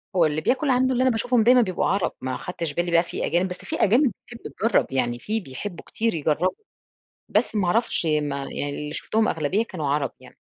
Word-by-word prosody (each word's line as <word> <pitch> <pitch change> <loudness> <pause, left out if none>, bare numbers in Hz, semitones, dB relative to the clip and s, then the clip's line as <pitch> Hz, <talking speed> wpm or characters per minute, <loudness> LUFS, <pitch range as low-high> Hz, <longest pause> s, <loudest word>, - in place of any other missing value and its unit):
هو 175 -3 +5
اللي 155 0 0
بياكل 270 - +1
عنده 260 0 +3
اللي 250 - +1
أنا 260 - +4
باشوفهم 230 +1 +2
دايمًا 245 +2 +6
بيبقوا 185 -5 0
عرَب، 195 -1 +1
ما 130 0 -3
أخدتش 165 -2 -5
بالي 175 +2 -1
بقى 170 0 +5
في - - -4
أجانب، 175 +2 +1
بس 180 - -5
في - - -3
أجانب 240 +5 +3
بتحِب 240 - -11 0.2
تجَرَّب، 225 +2 +2
يعني 120 -2 -1
في 215 - -2
بيحبّوا 175 +2 -7
كتير 225 0 -1
يجربّوا 160 +3 +1 0.8
بس 220 +2 +1
ما 200 -3 +1
أعرفش 220 -2 +1
ما 150 -2 0
يعني 140 +1 -4
اللي 150 +1 -5
شُفتهم 220 +7 0
أغلبية 165 +8 0
كانوا 165 -9 -5
عرَب 140 -1 0
يعني. - - -16
180 Hz, 210 wpm, -24 LUFS, 150-225 Hz, 0.8 s, دايمًا